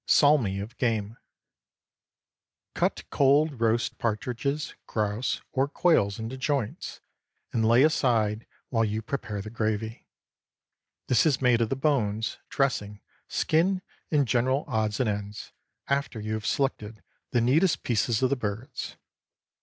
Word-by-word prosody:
SALMI 135 -10 +4
OF 110 +5 -8
GAME. 110 -3 0 1.6
Cut - - 0
cold 140 -1 +3
roast 115 +1 +1
partridges, 125 +6 -2
grouse, 105 +2 -1
or 135 +1 +1
quails 145 - +2
into 115 +4 -5
joints, 135 -4 -2 0.5
and 115 - +1
lay 120 +3 +6
aside 115 -8 +2 0.2
while 115 -3 +2
you 110 +1 -1
prepare 105 -5 -4
the 105 - -8
gravy. 110 0 -2 1.0
This 125 +5 +3
is 145 - +2
made 125 -3 +3
of 115 - +1
the - - 0
bones, 115 -7 0
dressing, 105 -7 -1 0.3
skin, 185 +4 +1 0.3
and 145 -4 +2
general 130 +4 +1
odds 110 -5 -1
and 130 - +2
ends, 105 0 -4 0.4
after 140 -4 -1
you 110 +1 -3
have 110 0 -3
selected 110 -7 -1 0.3
the 120 - +2
neatest 155 +10 +3
pieces 120 +1 +1
of 130 - +3
the - - +3
birds. 115 +3 -5
120 Hz, 130 wpm, -27 LUFS, 110-140 Hz, 1.6 s, lay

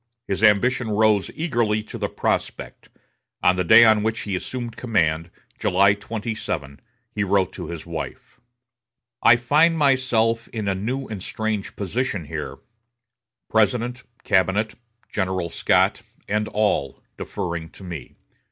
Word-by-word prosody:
His 95 - -2
ambition 115 +3 +3
rose 105 -1 +2
eagerly 120 -9 0
to - - -9
the - - -1
prospect. - - -3 0.5
On 90 - +5
the 90 - 0
day 110 +6 +8
on 110 -1 +5
which 110 +1 -1
he 100 -3 -3
assumed 120 +5 -5
command, 85 -8 0 0.3
July 100 +2 +4
27, 105 - -5 0.3
he 105 - -1
wrote 100 -1 +1
to - - -7
his 85 -2 -7
wife: 85 +8 -7 0.8
"I 115 - +7
find 150 +8 +3
myself 125 -5 +2
in 110 -3 -5
a 100 - +2
new 125 +8 -3
and 105 -4 -6
strange 110 0 -3
position 105 -2 -2
here; - - -5 0.9
President, 120 +3 +1 0.2
cabinet, 95 +3 +2 0.4
General 95 -3 -1
Scott, - - +2 0.3
and 105 +1 0
all, 105 -10 0 0.2
deferring 85 -2 -5
to - - -14
me. 85 -5 -8
105 Hz, 135 wpm, -23 LUFS, 95-115 Hz, 0.9 s, day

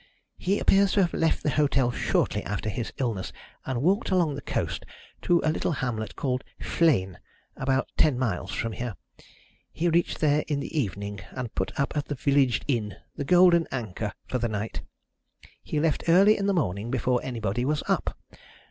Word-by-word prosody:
"He 195 +3 +1
appears 195 -2 +4
to 200 - +4
have 175 - -1
left 165 0 +1
the 150 - +1
hotel 135 -3 +2
shortly - - 0
after 110 - -3
his 115 +3 -4
illness, 115 -8 -2 0.4
and 130 -1 -1
walked 195 +6 +2
along 175 -5 +2
the 140 - -6
coast - - -2 0.4
to 175 -1 +3
a 155 - +3
little 160 - -1
hamlet 120 -6 -3
called 130 -2 -1 0.2
Flegne, 105 - +1 0.4
about 135 0 0
ten 145 -5 +4
miles 100 -7 -2
from 115 - -2
here. 120 -1 -4 0.8
He 170 +2 0
reached 170 +1 +1
there 150 -1 +3
in 145 -2 0
the 140 - -6
evening, 100 - -2
and 125 -3 -5
put - - -3
up 140 - 0
at 145 -1 -1
the 145 - -4
village 135 -3 +2
inn, 110 -8 -1 0.2
the - - -3
Golden 175 +2 +5
Anchor, 110 -4 -3
for 125 - -2
the 120 0 0
night. 105 +1 -4 0.8
He 150 - -2
left 155 -1 0
early 195 +5 +7
in 200 - -1
the - - +3
morning, 105 - -1
before 125 0 +1
anybody 115 -2 -2
was 150 +3 0
up. - - 0
135 Hz, 180 wpm, -27 LUFS, 115-160 Hz, 0.8 s, early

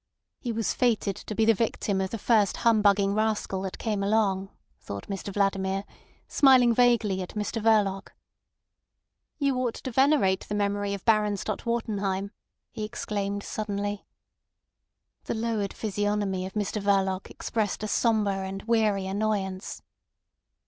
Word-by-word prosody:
He 240 - -3
was 225 -2 -1
fated 220 -5 +1
to 215 - -7
be 220 - +3
the 225 - +6
victim 205 -3 -1
of 190 - -1
the 230 - -4
first 215 -3 +2
humbugging 205 -3 +4
rascal 215 -3 0
that 190 -1 -5
came 210 -3 -2
along, 195 -2 +1 0.3
thought 100 0 -7
Mr 195 0 -5
Vladimir, 195 -1 0 0.4
smiling 255 -4 +5
vaguely 230 -5 +3
at 180 - -7
Mr 210 +2 -2
Verloc. 210 -3 +2 1.3
"You 280 -3 +1
ought 250 -2 -1
to 260 - -6
venerate 265 -7 +3
the 205 - -1
memory 205 0 0
of 195 - -11
Baron 210 -2 +3
Stott 215 +4 -4
Wartenheim," 200 -4 -1 0.4
he 215 - -5
exclaimed 205 -1 -3
suddenly. 205 -1 -4 1.2
The - - -2
lowered 220 -3 -1
physiognomy 205 -2 -1
of 190 - -11
Mr 210 0 -2
Verloc 195 -1 +1
expressed 215 -2 -2
a - - -1
sombre 215 -3 +1
and 190 +1 -5
weary 215 -4 +1
annoyance. 195 -1 -2
205 Hz, 140 wpm, -27 LUFS, 195-220 Hz, 1.3 s, the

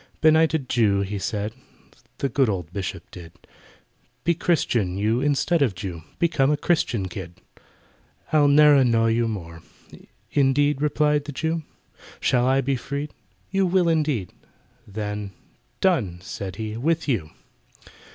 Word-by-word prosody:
"Benighted 160 -3 +3
Jew," 105 -6 +2
he 100 +1 -3
said 105 +1 -3 0.6
(The 140 - -1
good 135 -3 +1
old 90 -4 -4
Bishop 95 -3 -4
did), 85 -2 -11 0.9
"Be 170 - +3
Christian, 120 - 0
you, 110 +5 +1
instead 145 +4 +1
of 120 -9 +2
Jew— 90 -2 -6 0.2
Become 155 -5 +2
a 150 - +2
Christian 145 - 0
kid! 90 0 -8 0.9
"I'll 150 -2 +5
ne'er 150 +1 +7
annoy 115 -4 +3
you 115 0 +1
more." 85 -6 -6 0.7
"Indeed?" 145 +1 +2
replied 150 0 +1
the 150 - -5
Jew; 160 +4 -2 0.6
"Shall 125 0 +2
I 135 +1 +3
be 135 +1 0
freed?" 140 +4 -5 0.4
"You 195 -1 +2
will, 180 -1 +2
indeed!" 150 - 0 0.5
Then 105 -1 -5 0.5
"Done!" 125 - +1
said 95 -1 -6
he, 110 0 -5
"with 160 +6 0
you!" 105 - -1
125 Hz, 135 wpm, -24 LUFS, 100-150 Hz, 0.9 s, ne'er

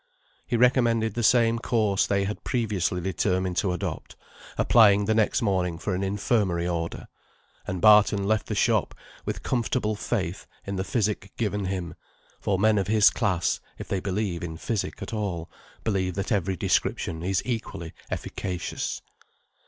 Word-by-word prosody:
He 120 - 0
recommended 115 -3 +3
the 120 - -2
same 115 0 +4
course 110 -5 +1
they 100 -1 +1
had 105 +2 -4
previously 100 -7 -1
determined 95 0 0
to 95 - +1
adopt, 90 - -4 0.4
applying 105 -3 +5
the 110 - +2
next 110 +1 +2
morning 90 -5 0
for 95 +3 -3
an 90 - -1
infirmary 95 -3 0
order; 85 -1 -3 0.6
and 95 - -3
Barton 105 -1 +6
left 105 +1 0
the - - -2
shop - - +1 0.3
with - - -4
comfortable 120 -3 0
faith - - -3 0.2
in 100 - -3
the 95 - -1
physic 105 -2 -1
given 105 -3 -1
him; 90 -2 -3 0.5
for 100 - 0
men 105 +1 +3
of 95 - -1
his 110 0 +5
class, 95 -7 0 0.2
if - - -8
they 95 - -1
believe 95 -2 -2
in 80 -2 -5
physic 110 +3 -3
at - - -7
all, 95 -6 -3 0.3
believe 95 -4 0
that 100 +3 -3
every 95 -2 +1
description 80 +1 0
is 95 +2 0
equally 110 -9 -4 0.2
efficacious. 90 -3 -4
100 Hz, 155 wpm, -26 LUFS, 90-110 Hz, 0.6 s, Barton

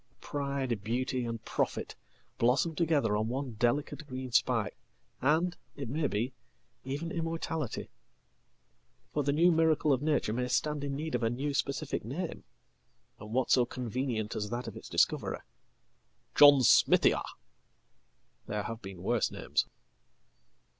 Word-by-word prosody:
Pride, 140 -6 -2
beauty, 125 +3 -1
and 115 -1 -5
profit - - -2 0.5
blossom 130 +7 +3
together 150 -10 +2
on 110 +1 0
onedelicate 130 +4 -1
green 130 -1 -6
spike, - - +2 0.5
and, 160 +6 +2 0.2
it 140 -5 -5
may 150 +3 0
be, 120 +3 -2 0.5
even 145 +6 -4
immortality. 165 -4 -3 1.2
For 150 - +1
the 140 0 +1
newmiracle 160 -1 +4
of 130 - 0
nature 150 -8 +1
may 125 +1 -1
stand 150 +3 0
in 140 -1 -2
need 155 +3 -4
of 125 - 0
a 115 - +2
new 140 +5 -2
specific 140 +1 -1
name, 155 - -5 0.7
and 105 +1 -9
what 130 +2 +1
soconvenient 120 -2 0
as 105 -1 -2
that 120 +1 -4
of - - -6
its - - -10
discoverer? - - +1 0.9
"John 145 -2 +8
smithia"! - - +5 1.3
There 105 0 -2
have 115 +2 -5
beenworse 95 +4 -1
names. - - -1
130 Hz, 125 wpm, -31 LUFS, 120-150 Hz, 1.3 s, John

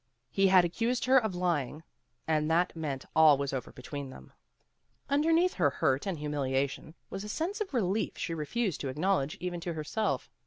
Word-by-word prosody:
He 195 0 +3
had 185 -2 +6
accused 235 +9 -1
her 260 +1 +6
of 220 -6 -3
lying, 160 -4 -1 0.4
and 155 -1 +1
that 170 +2 +2
meant 145 -5 -4
all 155 -2 +7
was 140 0 -2
over 130 - -4
between 140 +2 -7
them. - - -13 0.8
Underneath 325 +5 +3
her 145 - +3
hurt 135 +3 0
and 185 -4 -2
humiliation 145 +1 -2 0.2
was 195 - -5
a 210 - -7
sense 355 - -2
of 410 - -3
relief 215 -5 0
she 165 - -3
refused 170 - -2
to 140 - -3
acknowledge 155 0 0
even 175 -1 -3
to 170 0 -4
herself. 160 - -2
170 Hz, 180 wpm, -30 LUFS, 145-210 Hz, 0.8 s, all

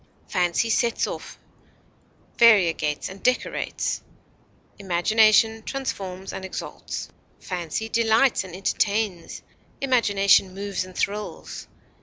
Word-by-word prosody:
Fancy 180 +5 +1
sets 235 0 +1
off, - - -7 1.0
variegates, 175 -10 +4
and 190 +1 -10
decorates; 250 0 -1 0.8
imagination 215 +4 +3
transforms 195 -8 -5
and 190 - -6
exalts. 190 - -6 0.3
Fancy 180 +4 -4
delights 230 +2 +3
and 180 -2 -9
entertains; 200 -1 -1 0.4
imagination 200 -7 +3
moves 200 -1 -3
and 185 -1 -13
thrills. 210 +1 -4
200 Hz, 90 wpm, -24 LUFS, 185-225 Hz, 1.0 s, variegates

